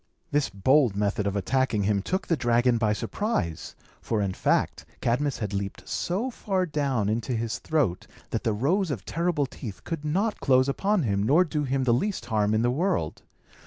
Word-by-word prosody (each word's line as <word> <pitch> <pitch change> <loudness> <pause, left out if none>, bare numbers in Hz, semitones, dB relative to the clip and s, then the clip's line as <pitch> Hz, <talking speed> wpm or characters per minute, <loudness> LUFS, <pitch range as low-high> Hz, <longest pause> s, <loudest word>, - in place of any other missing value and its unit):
This 145 -1 +1
bold 115 +3 +3
method 105 +1 0
of 100 - -1
attacking 110 +1 +1
him 100 0 +1
took 185 - -2
the 165 - +1
dragon 120 -2 +2
by 110 -2 +2
surprise; 105 - -2 0.3
for, 110 - -1
in 100 -2 0
fact, - - 0 0.2
Cadmus 135 +4 0
had 105 -3 -4
leaped 100 0 -4
so 210 +9 -1
far 190 -5 -1
down 140 - 0
into 110 +3 -1
his 115 +1 -2
throat, 140 - 0 0.2
that - - -2
the 115 - +1
rows 160 - +1
of 125 -9 -4
terrible 170 -4 0
teeth 115 -6 -8
could 165 -3 -4
not 195 +9 0
close 130 -1 +4
upon 195 +6 +1
him, 100 -4 0
nor 145 - +5
do 150 -4 -2
him 135 0 0
the 120 -2 +3
least 185 - -1
harm 110 -2 +1
in 110 - +2
the 120 - +3
world. 165 - -1
125 Hz, 190 wpm, -26 LUFS, 105-155 Hz, 0.3 s, nor